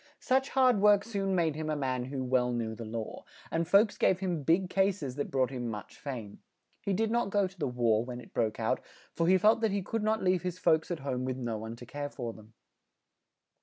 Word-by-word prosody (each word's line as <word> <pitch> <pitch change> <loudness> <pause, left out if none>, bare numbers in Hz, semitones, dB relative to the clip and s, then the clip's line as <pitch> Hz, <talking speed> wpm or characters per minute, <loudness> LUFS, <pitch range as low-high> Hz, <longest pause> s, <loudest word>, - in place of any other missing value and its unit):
Such 265 +1 +1
hard 255 -5 +4
work 205 0 +5
soon 195 -3 -1
made 165 -3 +2
him 155 0 -3
a 155 - 0
man 130 -3 -1
who 130 0 -4
well 125 -1 +2
knew 115 -2 -2
the 115 +1 -7
law; 110 0 -5 0.3
and 165 0 0
folks 200 +4 +4
gave 185 - +3
him 180 -5 -1
big 170 +6 +2
cases 190 -8 0
that 145 - -3
brought 130 -2 +1
him 120 -3 -3
much 105 -2 -7
fame. 115 -8 -7 0.4
He 200 - -2
did 220 +3 +1
not 235 -3 +1
go 200 0 +2
to 190 0 -9
the 145 - 0
war, 115 -3 +2
when 120 0 -6
it - - -14
broke 110 -2 0
out, - - +1 0.3
for 165 - 0
he 190 +1 +6
felt 215 +4 +4
that 225 - +3
he 200 -1 -1
could 225 +4 -2
not 215 0 +1
leave 185 -1 +2
his 180 0 -3
folks 160 -3 +2
at 175 -5 -3
home 130 -2 -2
with 130 0 -2
no 120 -4 -3
one 110 +1 -6
to 120 - -11
care 145 +3 -5
for 120 -5 -5
them. 110 0 -16
155 Hz, 240 wpm, -30 LUFS, 125-195 Hz, 0.4 s, he